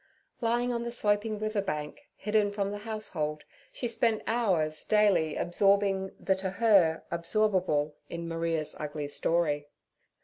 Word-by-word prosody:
Lying 240 +1 +1
on 235 - -1
the 235 - -3
sloping 210 -1 0
river 215 -1 -1
bank, 150 - -4 0.2
hidden 210 -1 +1
from 200 -1 -2
the 205 - -5
house 215 0 -5
hold, 150 -2 -3 0.3
she 245 - -3
spent 230 -1 +1
hours 180 -10 +1
daily 200 -7 +3
absorbing 195 +1 +2
theto 190 0 -1
her, 195 -8 +4
absorbable 170 -4 +1 0.2
in 170 0 -5
Maria's 165 -2 -1
ugly 150 -1 -4
story. 145 -1 0
195 Hz, 135 wpm, -29 LUFS, 160-215 Hz, 0.3 s, her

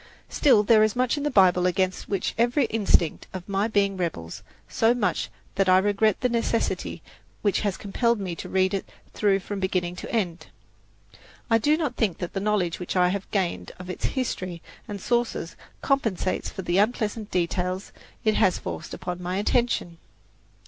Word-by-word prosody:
Still 240 -8 +4
there 215 +1 +5
is 215 -1 +3
much 250 +1 +2
in 290 - -3
the 295 - 0
Bible 180 -6 +4
against 185 +1 -1
which 195 -2 -1
every 245 +4 +2
instinct 200 -7 +2
of 185 -2 -7
my 200 +1 0
being 200 -3 +1
rebels, 155 - -4 0.3
so 230 +2 +2
much 205 -7 0 0.2
that 195 -1 +2
I 185 - +7
regret 205 +2 +2
the 250 - +3
necessity 230 -1 -1 0.4
which 205 -2 +2
has 205 -3 -1
compelled 235 +3 0
me 185 -4 -3
to - - -7
read 190 0 +2
it 195 - -3 0.2
through 200 -2 +2
from 200 +2 -5
beginning 185 -2 -1
to - - -7
end. 180 -7 -2 1.0
I 225 - +5
do 295 +7 +3
not 295 -7 -2
think 205 -7 +1
that 175 - -5
the 195 - -1
knowledge 195 -4 0
which 180 - -4
I 180 -1 +4
have 195 +1 -3
gained 170 - -2
of 180 0 -7
its - - -4
history 185 -10 -3 0.2
and 205 -1 -5
sources 235 -6 -1 0.3
compensates 225 -10 0
me - - -15
for - - -3
the 175 +2 +1
unpleasant 215 -1 0
details 180 +1 -1 0.3
it 215 - +3
has 190 -3 +3
forced - - -6
upon 180 -1 -5
my 180 +1 -2
attention. 205 -5 0
195 Hz, 180 wpm, -25 LUFS, 180-225 Hz, 1.0 s, I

